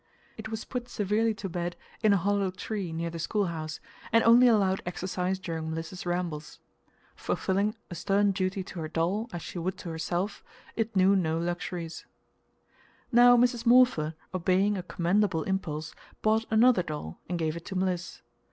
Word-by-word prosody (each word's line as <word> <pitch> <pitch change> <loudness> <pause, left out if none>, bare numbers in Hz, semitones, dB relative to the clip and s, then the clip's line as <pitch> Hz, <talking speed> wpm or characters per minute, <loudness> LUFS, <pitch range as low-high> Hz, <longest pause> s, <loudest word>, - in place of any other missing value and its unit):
It 220 0 -7
was 220 0 -5
put 245 -1 -5
severely 215 +2 +1
to 205 -2 -5
bed 175 -1 -3 0.3
in 215 -1 +4
a 200 - +5
hollow 200 +1 +1
tree 190 -1 -4
near 165 +1 -3
the 165 - -6
schoolhouse, 165 -5 -2 0.3
and 230 +1 +5
only 240 +2 +7
allowed 195 -5 +3
exercise 180 +1 -2
during 165 -3 -4
Mliss's 165 +3 -5
rambles. 170 -4 -3 0.6
Fulfilling 200 +3 0 0.2
a - - -3
stern 200 +4 +2
duty 190 0 -1
to 185 - -8
her 155 - -3
doll, 180 +8 -1
as 175 -3 -6
she 175 - -6
would 185 +2 -2
to 180 - -7
herself, 175 +5 -3 0.3
it 225 -1 -2
knew 190 +1 +5
no 165 -4 +1
luxuries. 170 0 -4 1.0
Now 245 0 +7
Mrs. 240 -1 +2
Morpher, 235 -11 +5 0.2
obeying 185 +3 +2
a 190 - -2
commendable 180 0 +1
impulse, 160 -5 -3 0.3
bought 220 +1 +3
another 225 -1 +5
doll 150 - -6
and 180 - -1
gave 160 -1 -1
it 170 - -8
to 190 - -6
Mliss. 185 -1 -2
185 Hz, 165 wpm, -28 LUFS, 170-210 Hz, 1.0 s, only